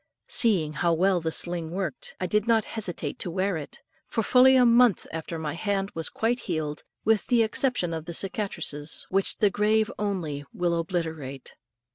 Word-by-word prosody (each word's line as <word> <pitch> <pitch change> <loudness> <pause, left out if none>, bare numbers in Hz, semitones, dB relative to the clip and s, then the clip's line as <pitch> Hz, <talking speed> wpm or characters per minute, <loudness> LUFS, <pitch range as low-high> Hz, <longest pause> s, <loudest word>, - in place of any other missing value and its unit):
Seeing 180 -10 +2
how 170 +3 +1
well 180 +2 +2
the 160 0 -2
sling 170 -1 -2
worked, 175 -5 -5
I 185 - -1
did 210 +4 0
not 225 -2 +3
hesitate 175 -9 -4
to - - -2
wear 190 +2 0
it, 150 -3 -7 0.3
for 225 - -1
fully 260 +4 +6
a 250 -1 +6
month 235 -3 +5
after 160 +1 -5
my 155 -2 -3
hand 195 +2 -1
was 165 -1 -3
quite 235 +2 0
healed, 155 -3 -2 0.2
with 220 -1 +2
the 240 -2 +4
exception 220 -6 0
of 160 -1 -5
the 170 - -6
cicatrices, 185 -7 -2
which 195 +1 +2
the 205 -2 +3
grave 215 +1 +2
only 175 -9 -2
will 175 -1 0
obliterate. 160 -6 -4
185 Hz, 175 wpm, -26 LUFS, 160-215 Hz, 0.3 s, fully